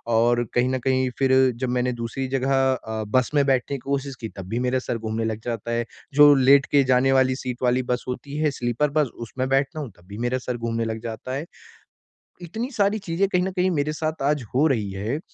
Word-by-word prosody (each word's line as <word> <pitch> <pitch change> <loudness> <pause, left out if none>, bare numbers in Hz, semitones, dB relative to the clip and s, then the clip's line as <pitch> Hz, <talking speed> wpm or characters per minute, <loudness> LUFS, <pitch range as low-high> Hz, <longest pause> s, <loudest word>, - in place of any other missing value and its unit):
और 120 +1 +3
कहीं 125 +1 +2
न 130 0 -1
कहीं 130 0 +1
फिर 135 -1 +3 0.2
जब 130 0 -2
मैंने 125 0 0
दूसरी 130 +3 -3
जगह 135 +1 +1 0.2
अ, 110 -3 -4
बस 125 +3 +1
में 145 -1 +4
बैठने 135 0 +1
की - - -11
कोशिश 140 -1 -2
की, 110 - -4
तब 95 -2 -7
भी 115 +3 -1
मेरा 130 +1 +1
सर 120 - -3
घूमने 110 0 -3
लग 110 -1 -2
जाता 115 -1 -3
है। 115 0 0 0.3
जो 145 +1 +8
लेट 135 +1 +5
के 145 -1 +5
जाने 130 +1 +4
वाली 130 -1 +3
सीट 130 -1 -5
वाली 125 +1 +2
बस 125 - -4
होती 140 +3 -5
है, 155 -1 +1
स्लीपर 125 +3 -1
बस 150 - +3 0.2
उसमें 130 +3 -3
बैठता 135 +3 +1
हूँ, 140 -6 -5
तब 85 - -21
भी 100 +1 -9
मेरा 130 +1 0
सर 125 -1 -1
घूमने 115 -1 -2
लग 110 0 -3
जाता 115 +2 -5
है। 140 +4 -4 1.0
इतनी 220 - -5
सारी 210 -2 +1
चीजें 190 0 0
कहीं 180 -2 +1
न 190 - -2
कहीं 185 0 +1
मेरे 150 -2 0
साथ 155 0 -3
आज 150 -4 -2
हो 145 +5 +4
रही 110 -9 0
है, 105 +9 -3
130 Hz, 230 wpm, -24 LUFS, 120-145 Hz, 1.0 s, जो